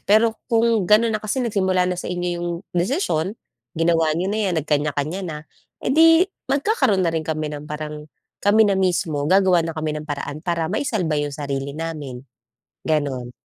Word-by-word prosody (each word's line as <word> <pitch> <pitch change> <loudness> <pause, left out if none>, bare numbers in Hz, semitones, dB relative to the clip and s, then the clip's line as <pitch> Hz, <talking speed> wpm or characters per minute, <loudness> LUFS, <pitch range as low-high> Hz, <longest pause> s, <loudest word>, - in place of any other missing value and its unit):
Pero, 220 +2 +4
kung 230 -4 +2
gano'n 220 +3 +5
na 215 - 0
kasi 215 +5 -2
nagsimula 190 -5 +1
na 180 - -3
sa - - -5
inyo 180 0 -2
yung 175 0 -3 0.2
desisyon. 180 - 0 0.4
Ginawa 165 -1 +2
niyo 180 +4 -1
na 215 - -1
'yan. 180 - 0
Nagkaniya-kaniya 150 +4 -1
na. 150 -3 -6 0.4
Eh, - - -1
di, 325 +4 +6 0.2
magkakaroon 275 - +2
na 170 - +2
rin 160 -1 -3
kami 155 -1 -2
ng 150 0 -7
parang 150 0 -6 0.3
Kami 215 +2 +5
na 205 - +3
mismo, 170 -6 0
gagawa 190 -2 +4
na 165 -1 -4
kami 155 -1 -2
ng 150 - -12
paraan, 145 +1 -4
para 170 -1 -1
maisalba 205 - -1
yung 145 - -1
sarili 140 -1 -4
namin." 150 -6 -5 0.6
Ganun. 140 -6 -1
170 Hz, 175 wpm, -22 LUFS, 150-205 Hz, 0.6 s, di